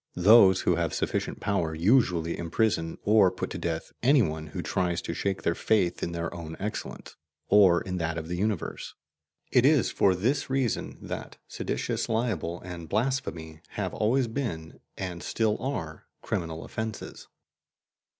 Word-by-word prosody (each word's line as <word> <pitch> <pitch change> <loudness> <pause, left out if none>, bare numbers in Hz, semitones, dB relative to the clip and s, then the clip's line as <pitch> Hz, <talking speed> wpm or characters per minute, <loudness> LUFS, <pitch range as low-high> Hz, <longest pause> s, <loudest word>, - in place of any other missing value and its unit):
Those 95 0 +7
who 90 - +2
have 85 -3 -1
sufficient - - -2
power 85 -6 -1
usually 85 -3 +2
imprison 85 -2 0
or 105 -2 +5
put - - -5
to - - -4
death - - -3
any 135 +1 +5
one 80 -2 -3
who 75 - -5
tries 90 -2 0
to - - -3
shake 95 +3 -2
their 85 - +2
faith 95 -2 +1
in 85 - -2
their 85 0 -3
own 80 -2 -7
excellence 105 +2 -5 0.3
or 95 -4 +6
in 90 -1 -4
that 85 -1 -2
of 80 -1 -5
the 90 - -3
universe; 100 -1 -3 0.6
it 125 - +5
is 145 -1 +4
for 95 -2 +3
this 130 +11 0
reason 130 -4 -1
that - - -6
seditious - - -3
libel 110 -7 -1
and 85 -2 -8
blasphemy 100 -10 -2
have - - -3
always 120 +4 +2
been, 110 - -4 0.2
and 90 -3 -5
still 110 -2 0
are, 80 - -4 0.2
criminal 80 -1 -3
offences. 110 -2 -6
95 Hz, 155 wpm, -27 LUFS, 85-110 Hz, 0.6 s, Those